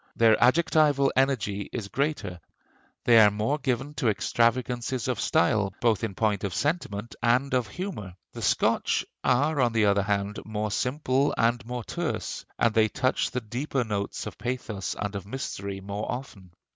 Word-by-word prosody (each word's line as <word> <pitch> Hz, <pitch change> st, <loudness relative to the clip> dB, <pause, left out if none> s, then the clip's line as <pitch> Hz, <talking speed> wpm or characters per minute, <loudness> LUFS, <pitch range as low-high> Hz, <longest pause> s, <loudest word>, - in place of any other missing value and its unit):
Their 115 Hz, -1 st, +5 dB
adjectival 145 Hz, -1 st, +3 dB
energy 110 Hz, -7 st, 0 dB
is 110 Hz, -5 st, -4 dB
greater; 110 Hz, -, -2 dB, 0.6 s
they 115 Hz, -2 st, +6 dB
are 105 Hz, -1 st, +8 dB
more 110 Hz, +8 st, -1 dB
given 135 Hz, +1 st, -2 dB
to 120 Hz, -, +2 dB
extravagances 120 Hz, +2 st, 0 dB
of -, -, -1 dB
style, 100 Hz, +2 st, +2 dB
both 115 Hz, -4 st, +2 dB
in 105 Hz, -4 st, -3 dB
point 105 Hz, -2 st, 0 dB
of 100 Hz, -4 st, -2 dB
sentiment 120 Hz, -9 st, -2 dB
and 125 Hz, +4 st, +2 dB
of 125 Hz, -3 st, +1 dB
humor. 105 Hz, -, -6 dB, 0.2 s
The -, -, -7 dB
Scotch -, -, +1 dB, 0.2 s
are 145 Hz, +3 st, +2 dB
on 120 Hz, -2 st, +2 dB
the 110 Hz, -2 st, +3 dB
other 100 Hz, 0 st, +3 dB
hand 100 Hz, +1 st, -1 dB
more 105 Hz, -1 st, -3 dB
simple 130 Hz, +3 st, 0 dB
and 115 Hz, +1 st, +2 dB
more 125 Hz, -1 st, -4 dB
terse, -, -, -4 dB
and 115 Hz, -, +2 dB
they 110 Hz, -1 st, +4 dB
touch 130 Hz, +4 st, 0 dB
the 125 Hz, -, -3 dB
deeper 125 Hz, +4 st, -2 dB
notes 105 Hz, -3 st, -3 dB
of -, -, -8 dB
pathos 120 Hz, -5 st, -3 dB
and 105 Hz, 0 st, -3 dB
of 100 Hz, 0 st, -6 dB
mystery 100 Hz, -5 st, -5 dB
more 100 Hz, +2 st, -4 dB
often. 115 Hz, -8 st, -7 dB
115 Hz, 165 wpm, -27 LUFS, 105-130 Hz, 0.6 s, are